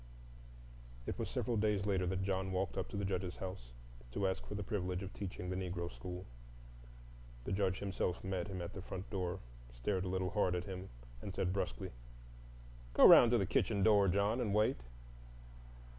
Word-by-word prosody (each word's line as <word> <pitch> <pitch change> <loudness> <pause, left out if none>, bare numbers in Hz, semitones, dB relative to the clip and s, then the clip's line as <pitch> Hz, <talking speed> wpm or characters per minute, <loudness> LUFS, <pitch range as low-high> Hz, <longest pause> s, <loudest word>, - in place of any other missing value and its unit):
It - - -4
was - - -2
several 120 -2 -1
days 105 -2 +2
later 95 -3 +1
that 95 +1 -1
John 95 0 -1
walked 95 0 -1
up - - -2
to - - -5
the 100 - -1
Judge's 90 -1 -2
house 75 -11 -6 0.4
to 100 - +1
ask 95 - -2
for 105 - -5
the 105 - -2
privilege 90 -2 -2
of 95 - -7
teaching 95 -2 -5
the - - -1
Negro 90 -2 -3
school. 90 0 -6 1.2
The - - -4
Judge 95 -1 +1
himself 95 -2 -2
met 95 -1 -2
him 95 -3 -4
at 85 - -6
the 95 - -6
front 95 +1 -7
door, 95 -2 -2 0.3
stared 90 +11 -1
a - - -3
little 95 0 -1
hard 95 -4 +2
at 90 - -1
him, 95 -2 -6 0.3
and 100 - -6
said 90 -1 0
brusquely, 60 -11 -2 1.0
"Go - - +9
'round 120 - +10
to 120 - +4
the 100 - +1
kitchen 100 0 +1
door, 100 -2 +6
John, 100 +6 +2
and 105 -4 0
wait." 110 +5 +3
95 Hz, 190 wpm, -36 LUFS, 90-100 Hz, 1.2 s, round